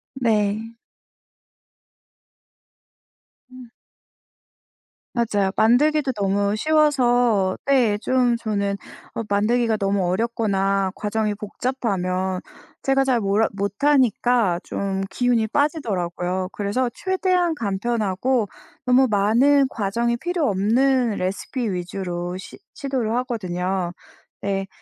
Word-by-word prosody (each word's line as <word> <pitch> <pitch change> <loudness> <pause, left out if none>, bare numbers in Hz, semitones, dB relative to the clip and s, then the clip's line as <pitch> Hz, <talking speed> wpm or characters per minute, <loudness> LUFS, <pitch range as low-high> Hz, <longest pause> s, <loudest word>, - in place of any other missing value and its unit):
네. 220 -2 0 2.8
음. 255 -2 -12 1.4
맞아요. 205 -5 +1
만들기도 275 +5 +3
너무 200 -1 0
쉬워서 245 -9 +2
네 250 -7 +3
좀 250 -1 +2
저는 200 -3 -1 0.4
어 230 - -2
만들기가 220 +3 +2
너무 195 -2 0
어렵거나 195 -2 0
과정이 210 0 -1
복잡하면 195 -5 -2 0.4
제가 270 0 +2
잘 250 -3 +2
몰라 205 +2 +2
못하니까 230 -2 +2
좀 195 -1 -3
기운이 245 -3 +1
빠지더라고요. 185 - -1
그래서 210 +5 -1
최대한 370 -1 0
간편하고 220 +1 0 0.4
너무 255 +1 +5
많은 240 +8 +4
과정이 235 +3 -1
필요 345 +1 -1
없는 240 +5 +2
레시피 200 +5 -3
위주로 180 -1 -4
시 190 - -10 0.2
시도를 255 -5 -2
하거든요. 185 -7 -2 0.5
네. 195 -1 -2
220 Hz, 220 characters per minute, -22 LUFS, 195-255 Hz, 2.8 s, 너무